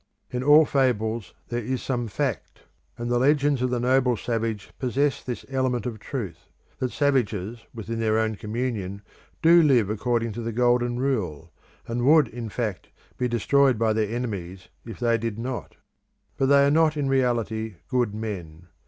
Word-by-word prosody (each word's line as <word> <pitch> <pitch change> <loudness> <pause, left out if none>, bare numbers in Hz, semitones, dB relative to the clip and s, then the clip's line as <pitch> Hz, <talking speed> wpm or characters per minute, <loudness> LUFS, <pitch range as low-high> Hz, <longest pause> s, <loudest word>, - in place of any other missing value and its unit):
In 125 - -2
all 150 +3 +7
fables 115 -6 0
there 120 - -1
is 130 +3 -2
some 120 -3 -2
fact; 100 - -3 0.4
and 120 0 -4
the 120 0 +1
legends 145 0 +3
of 125 - +1
the 125 -1 -1
noble 125 0 +2
savage 115 -1 -3
possess 135 +2 0
this 125 -2 -6
element 130 -2 -1
of 115 -3 -4
truth, 100 - -6 0.3
that 130 -1 -1
savages 115 -6 0
within 115 0 -5
their 110 -1 +2
own 110 0 +1
communion 105 -3 -4 0.4
do 170 +1 +7
live 125 -9 +3
according 115 +1 0
to 115 +3 -5
the 115 0 -3
Golden 120 +1 +2
Rule, 90 - -2 0.3
and 120 +1 -2
would, 150 +1 +6
in 115 -1 -6
fact, 105 -4 -4 0.3
be 125 - +1
destroyed 130 +2 +3
by 110 0 +2
their 110 -1 0
enemies 100 -6 -5 0.2
if 115 - -8
they 115 -1 +2
did 115 -2 -3
not. 125 +1 -5 0.6
But 135 - +1
they 140 0 +6
are 140 - +3
not 155 0 +3
in 145 -2 0
reality 115 -5 0
good 120 -5 0
men. 90 -6 -6
120 Hz, 170 wpm, -25 LUFS, 110-130 Hz, 0.6 s, all